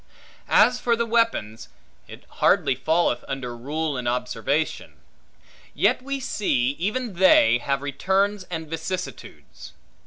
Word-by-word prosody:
As 245 0 +4
for 235 -1 +1
the 235 0 -1
weapons, 225 - -1 0.4
it - - -12 0.2
hardly - - +3
falleth 155 -1 0
under 125 -3 -5
rule 145 +4 -3
and 125 -1 -4
observation: 125 +5 -2 0.8
yet - - +2
we 275 +1 -4
see 140 - 0
even 215 +5 -2
they, 170 -10 +5
have 140 +2 -2
returns 190 +7 0
and 160 -3 -6
vicissitudes. 180 +4 -7
160 Hz, 120 wpm, -24 LUFS, 130-205 Hz, 0.8 s, they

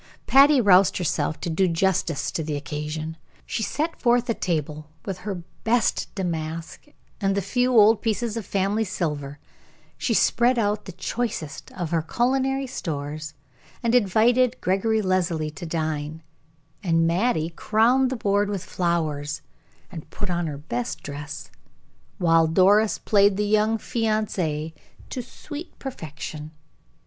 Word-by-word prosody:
Patty 280 +1 +6
roused 195 -3 +5
herself 155 -3 -1
to - - -2
do 185 +4 +2
justice 165 -5 0
to - - -2
the 155 -1 -3
occasion. 150 +2 -4 0.3
She - - -3
set 310 +9 -2
forth 240 -1 +3
a - - +2
table 155 -5 -3 0.2
with 190 -2 -4
her 190 -3 -5 0.2
best 230 +1 +2
damask 165 - -4 0.3
and 195 -1 +1
the 200 - +1
few 245 +5 +1
old 215 +1 +6
pieces 225 0 -1
of 230 - -3
family 200 +3 0
silver; 150 -8 -3 0.6
she 230 - +1
spread 240 +4 +3
out 210 -1 0
the 190 - -7
choicest 185 -4 -4
of 175 -3 -4
her 165 -1 +2
culinary 265 - 0
stores, 150 - -5 0.5
and 230 0 +1
invited 245 +3 +3
Gregory 215 +4 +1
Leslie 175 -5 0
to 170 +2 -8
dine, 155 -1 -3 0.6
and 165 -4 +2
Mattie 170 -1 +1
crowned 235 +8 +3
the 260 - -2
board 205 -2 +1
with 195 -3 -3
flowers, 155 -5 -1 0.5
and 165 -5 -9
put 205 -3 -4
on 175 -1 -1
her 145 -2 -4
best 125 -5 -4
dress, 145 0 -7 0.7
while 165 -2 +4
Doris 200 +6 +4
played 200 -2 +3
the 210 - +1
young 215 +2 +2
fiancee 200 -10 -1 0.4
to 255 - -3
sweet 295 +6 -9
perfection. 155 - -7
185 Hz, 140 wpm, -24 LUFS, 160-220 Hz, 0.7 s, Patty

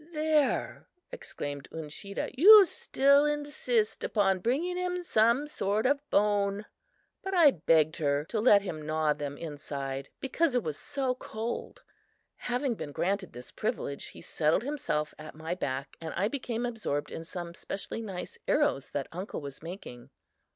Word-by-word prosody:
"There," 305 -2 +1 0.2
exclaimed 145 - -6
Uncheedah, 160 +5 -5
"you 405 +8 +10
still 280 -3 +3
insist 290 -7 0
upon 195 -3 +2
bringing 285 - 0
in 360 0 -2
some 235 -1 +3
sort 215 -7 -1
of 280 +2 +3
bone!" 205 0 +2 0.6
but 385 0 -3
I 325 -5 +7
begged 160 - +2
her 145 -1 0
to 200 +6 -2
let 210 -3 +6
him 160 -6 -5
gnaw 155 0 +1
them 145 -1 -5
inside 140 -3 -5
because 280 +1 0
it 245 - +2
was 155 -2 -3
so 270 - -2
cold. 230 -2 -5 0.5
Having 250 +1 -1
been 150 -9 -6
granted 195 +3 -1
this 125 +1 -10
privilege, 175 - -3
he - - -11
settled 160 +6 +1
himself 270 - -2
at 155 0 -9
my 160 +2 -4
back 140 -5 -4
and 160 -1 -5
I 190 +4 +1
became 245 -3 -3
absorbed 220 -12 -3
in 165 - -6
some 170 0 -6
specially 200 +5 -6
nice 190 -5 -6
arrows 285 - +2
that 140 -2 -3
uncle 185 +5 -5
was 140 -2 -8
making. 165 -8 -9
200 Hz, 150 wpm, -29 LUFS, -, 0.6 s, you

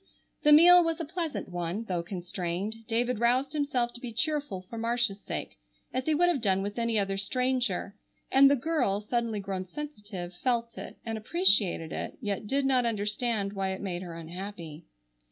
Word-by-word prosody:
The 300 - +5
meal 350 +4 +9
was 330 0 -1
a 330 - -3
pleasant 330 -1 -4
one, 175 +4 -3
though 180 -6 -2
constrained. 180 +4 -4
David 240 0 0
roused 255 +4 +2
himself 265 -5 0
to 240 - -10
be 245 - -5
cheerful 285 - -1
for 230 - -9
Marcia's 230 -3 +1
sake, - - -5 0.3
as 255 +2 -2
he 310 - +3
would 350 +3 +4
have 335 -8 +1
done 195 -3 +2
with 205 +3 -4
any 230 -1 +1
other 195 -1 0
stranger, 245 -2 0 0.4
and 275 +1 +7
the 285 - +4
girl, 255 -8 0
suddenly 230 0 -1
grown 190 -1 -4
sensitive, 205 -9 -7
felt 235 +5 -1
it, - - -8
and 225 -1 -3
appreciated 190 -4 +3
it, - - -5
yet 205 -4 -3
did 275 +4 +1
not 260 -2 +3
understand 210 -1 -1
why 195 -1 -1
it 190 - -6
made 180 -3 -3
her 175 -3 -7
unhappy. 170 -1 -8
225 Hz, 180 wpm, -29 LUFS, 195-260 Hz, 0.4 s, meal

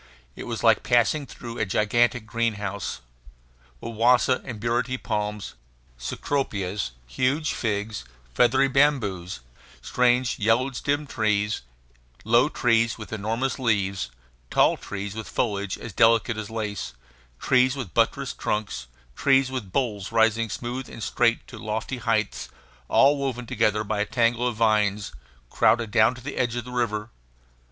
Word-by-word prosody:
It - - -7
was - - -4
like - - +5
passing 125 +4 +2
through 120 0 -8
a - - +1
gigantic 115 +4 +2
greenhouse. 105 -4 -2 0.8
Wawasa 120 - +2
and 120 -5 -7
burity 120 +3 0
palms, 105 -3 -3 0.5
cecropias, 100 - -2
huge 135 - 0
figs, 105 - -2 0.3
feathery 130 - +4
bamboos, 120 - +1 0.4
strange 125 - +1
yellow 115 +5 +2
stemmed 145 +3 -2
trees, 105 -1 0 0.6
low 120 +6 +4
trees 115 -4 +2
with 110 -1 -8
enormous 115 +6 -2
leaves, 100 - 0 0.4
tall - - +4
trees 100 0 -6
with 110 0 -7
foliage 100 -4 -1
as 115 - -8
delicate 115 +3 +4
as 110 -2 -5
lace, 105 - -4 0.5
trees 130 +1 +3
with 125 - -6
buttressed - - 0
trunks, 105 -12 -2 0.3
trees 135 -1 +3
with 120 -8 -5
boles 105 -6 -1
rising 115 0 +2
smooth 125 +4 -5
and 115 - -8
straight 115 -1 +1
to - - -11
lofty 110 +4 -3
heights, 115 -3 -1 0.4
all 140 +2 +5
woven 130 -3 -3
together 110 -4 +1
by 110 0 -2
a 105 - +1
tangle 120 0 +1
of 120 - -2
vines, 105 -2 +1 0.4
crowded 115 -3 +2
down 110 +3 +4
to 125 - -11
the 145 +4 -6
edge 120 -2 0
of 120 -1 -3
the 125 - -9
river. 115 -3 -2
115 Hz, 140 wpm, -25 LUFS, 105-125 Hz, 0.8 s, like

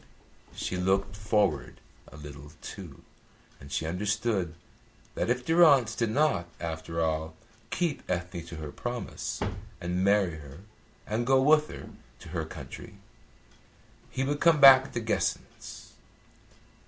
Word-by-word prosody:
She 90 - -3
looked 95 +2 +1
forward 105 -7 0 0.3
a - - -13
little, 75 0 -10
too, - - -9 0.6
and 70 - -12
she 80 - -1
understood 100 0 -1 0.6
that - - -2
if 125 +1 0
Durrance 150 -9 +5
did 115 -2 0
not, 110 - +1
after 80 0 -3
all, 80 0 -2 0.3
keep 170 -4 -1
Ethne 90 -1 -3
to 85 - -8
her 75 -2 -6
promise 120 +6 -5 0.4
and 90 +2 -1
marry 100 -4 +3
her 70 +2 -12 0.4
and 115 +3 -2
go 135 0 +5
with 150 +3 +5
her - - -9 0.3
to - - -12
her - - -3
country, - - -9 1.1
he 130 - -2
would 145 +2 -1
come 165 -3 +5
back 135 -1 +9
to 120 - -2
Guessens. 110 -1 -3
100 Hz, 130 wpm, -28 LUFS, 80-125 Hz, 1.1 s, back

